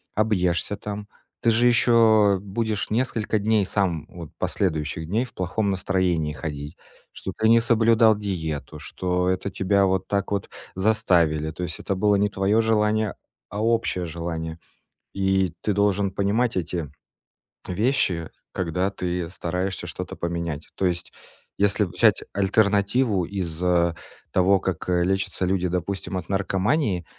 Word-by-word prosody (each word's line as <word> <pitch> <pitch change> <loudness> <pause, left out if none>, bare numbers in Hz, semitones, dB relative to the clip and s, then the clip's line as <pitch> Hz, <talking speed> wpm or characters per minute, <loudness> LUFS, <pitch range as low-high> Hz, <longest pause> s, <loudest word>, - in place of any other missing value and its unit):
объешься 100 -3 +1
там, 105 0 -6 0.3
ты 115 - +4
же 120 +2 +4
ещё 110 -4 +5
будешь 105 +1 -2
несколько 110 -2 0
дней 105 0 +2
сам 90 -6 -1
вот 85 -4 -10
последующих 80 -3 -1
дней 110 +7 +1
в - - -17
плохом 100 +3 -1
настроении 90 -5 0
ходить, 75 -1 -6 0.4
что 95 - -5
ты 110 - +2
не 115 0 +7
соблюдал 115 -1 +4
диету, 80 -7 -4
что 90 +2 -1
это 95 +1 -1
тебя 100 +1 +2
вот 95 0 0
так 100 0 -1
вот 100 -2 -2 0.2
заставили. 90 -7 +2
То 85 - -9
есть 85 -2 -4
это 100 - -2
было 105 +2 +3
не 100 +1 +2
твоё 100 +3 +2
желание, 110 -1 +1 0.4
а 105 +2 -4
общее 115 -6 +1
желание. 80 -1 -4 0.6
И 95 -2 +1
ты 105 - 0
должен 100 -1 +2
понимать 105 +4 +1
эти 85 -4 -3 0.8
вещи, 95 - 0 0.2
когда 90 +2 -1
ты 90 -3 -3
стараешься 90 +2 -3
что-то - - -6
поменять. 85 -3 -4
То 95 - -2
есть 85 -1 -2 0.5
если 100 +1 +3
взять 90 - +2
альтернативу 100 +1 +2
из, 90 -3 -4
э, 85 -2 +2 0.4
того, 95 +1 +4
как, 95 -3 -3
э, 90 -1 +2
лечатся 95 0 -1
люди, 90 -1 +1
допустим, 95 +2 -3
от 90 - -5
наркомании, 95 - 0
95 Hz, 140 wpm, -24 LUFS, 90-105 Hz, 0.8 s, не